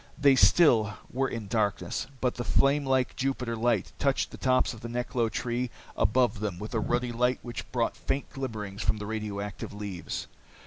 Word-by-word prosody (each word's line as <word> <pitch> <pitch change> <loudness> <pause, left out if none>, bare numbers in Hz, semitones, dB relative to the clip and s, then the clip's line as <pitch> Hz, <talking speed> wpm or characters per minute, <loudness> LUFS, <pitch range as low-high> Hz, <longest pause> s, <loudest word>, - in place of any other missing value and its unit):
They 140 -2 +6
still 115 - +5 0.2
were 135 +2 +1
in 115 -3 -4
darkness, 105 +2 -1
but 125 -2 +2
the 120 - -4
flame 140 +3 +3
like 130 -1 +2
Jupiter 130 -3 -1
light 120 +1 +1
touched 140 -1 +1
the - - -8
tops 130 -1 +2
of 115 - -11
the 115 - -6
neklo 120 -1 0
trees 120 +3 -2 0.3
above 115 +1 +2
them 100 -4 -2
with 105 +5 -7
a 115 - +1
ruddy 120 +3 0
light 125 +2 +2
which 120 -6 -6
brought - - 0
faint 140 - -2
glimmerings 110 -6 -5
from - - +1
the 105 - -5
radioactive 105 -2 -4
leaves. 100 -4 -5
120 Hz, 180 wpm, -28 LUFS, 105-130 Hz, 0.3 s, They